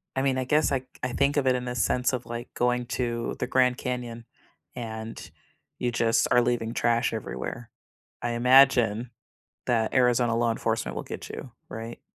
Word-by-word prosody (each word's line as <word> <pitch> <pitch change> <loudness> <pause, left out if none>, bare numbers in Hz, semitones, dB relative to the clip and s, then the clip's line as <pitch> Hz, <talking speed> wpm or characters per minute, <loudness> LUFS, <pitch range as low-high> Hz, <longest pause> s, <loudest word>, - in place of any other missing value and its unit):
I 135 - +1
mean, 135 -1 +1
I 130 - 0
guess, 150 +3 +2
I 130 -2 0 0.2
I 125 -1 -1
think 140 +3 +1
of 140 -2 +2
it 130 - +4
in 125 0 -2
the 125 0 -3
sense 125 +2 +1
of, 125 -1 -3
like, 120 0 -6
going 125 0 +1
to 120 -1 -2
the 125 - -1
Grand 125 -1 +2
Canyon, 120 -2 -4 0.5
and 110 -1 -6 0.5
you 120 - 0
just 115 0 +2
are 120 - +5
leaving 120 -1 -1
trash 120 0 +1
everywhere. 110 - -5 0.5
I 120 - -1
imagine 125 -2 +5 0.6
that 115 -2 +1
Arizona 120 -2 +3
law 120 0 +2
enforcement 115 0 -1
will - - -3
get - - -7
you, 130 -3 -8 0.2
right? 115 +1 -7
120 Hz, 180 wpm, -27 LUFS, 115-125 Hz, 0.6 s, are